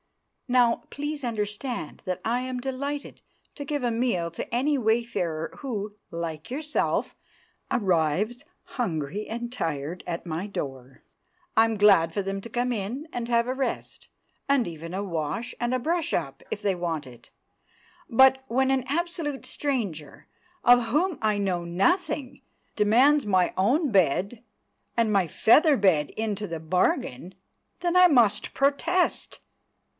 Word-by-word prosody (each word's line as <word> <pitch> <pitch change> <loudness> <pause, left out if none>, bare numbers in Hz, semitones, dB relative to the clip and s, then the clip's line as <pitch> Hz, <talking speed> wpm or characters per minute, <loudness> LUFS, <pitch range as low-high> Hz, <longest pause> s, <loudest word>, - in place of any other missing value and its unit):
"Now, 245 -2 +3
please 290 0 -4
understand 215 - -3
that 185 0 -2
I 240 +2 +1
am 255 -1 -4
delighted 280 +3 -4 0.3
to 285 - -6
give 285 -1 -3
a 240 - +1
meal 225 -8 0
to 170 - -7
any 280 +5 +2
wayfarer 220 -9 -1
who, 210 -6 -4
like 165 +1 -5
yourself, 300 +3 -1 0.5
arrives 195 - +1 0.2
hungry 190 - -3
and 235 +2 -5
tired 160 - -3
at 170 0 -4
my 170 +4 -3
door. 135 -8 -6 0.5
I'm 225 0 +4
glad 195 -6 +5
for 200 - 0
them 195 0 -3
to 230 - -9
come 245 +2 0
in 235 +9 -4
and 240 -1 -3
have 235 0 +2
a 255 - 0
rest, 265 0 -4 0.4
and 275 -7 +3
even 165 +1 -7
a 195 +2 -2
wash 175 +6 -3
and 240 +1 -1
brush 330 +4 -1
up, 135 -5 -2
if 205 - -3
they 200 -2 +1
want 165 -5 -3
it. 120 -2 -14 0.8
But, 265 +2 +5
when 265 +2 +2
an 265 -1 +1
absolute 330 -2 -2
stranger, 200 - -3 0.4
of 245 0 +6
whom 310 +7 +1
I 215 -1 +2
know 185 -4 -1
nothing, 255 - 0 0.3
demands 250 +7 +4
my 185 -3 +2
own 260 - +2
bed, 190 - +1 0.5
and 225 -2 +2
my 195 -3 +3
feather 285 - +5
bed 165 -8 +3
into 215 -2 -2
the 165 -2 -5
bargain, 175 -1 -1 0.4
then 350 0 0
I 365 0 +8
must 235 - +3
protest! 285 +6 +1
225 Hz, 140 wpm, -26 LUFS, 180-265 Hz, 0.8 s, I